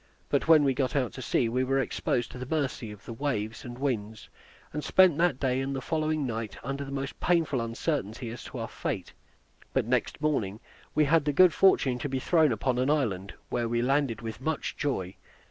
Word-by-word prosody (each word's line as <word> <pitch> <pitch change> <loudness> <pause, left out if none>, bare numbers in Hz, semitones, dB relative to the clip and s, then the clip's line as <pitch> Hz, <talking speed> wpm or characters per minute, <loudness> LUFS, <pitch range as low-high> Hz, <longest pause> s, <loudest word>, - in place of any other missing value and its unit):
But - - +1
when 160 -2 +7
we 135 -2 +3
got 130 +3 -1
out 130 -4 0
to 130 - -7
sea, 120 0 +1
we 125 +3 0
were 135 +1 +1
exposed 125 -2 -1
to 125 - -8
the 125 - -5
mercy 140 -7 -2
of 105 -1 -11
the 115 - -6
waves 115 -4 -2
and 120 -1 -8
winds, 110 -6 -3 0.4
and 150 0 -3
spent 185 -4 +5
that 170 -7 +2
day 130 -1 +1
and 135 +1 -2
the - - -2
following 155 +1 -1
night 115 -4 -4
under 140 +1 -3
the 135 - -7
most 140 0 -4
painful 165 -7 +2
uncertainty 115 -1 -2
as 120 - -8
to 130 - -7
our 115 -1 -3
fate; 135 - -4 0.6
but - - +1
next - - 0
morning 110 -10 0 0.4
we 155 - +4
had 155 +1 +3
the 150 - +2
good 180 +3 +6
fortune 135 -10 +4
to 145 - -3
be 135 - -1
thrown 155 +2 +3
upon 125 +3 0
an 130 +2 +1
island, 105 -11 0
where 120 -2 -1
we 120 0 +1
landed 135 -4 +1
with 115 +2 -6
much 155 +2 -2
joy. 95 -10 -2
130 Hz, 215 wpm, -28 LUFS, 115-145 Hz, 0.6 s, when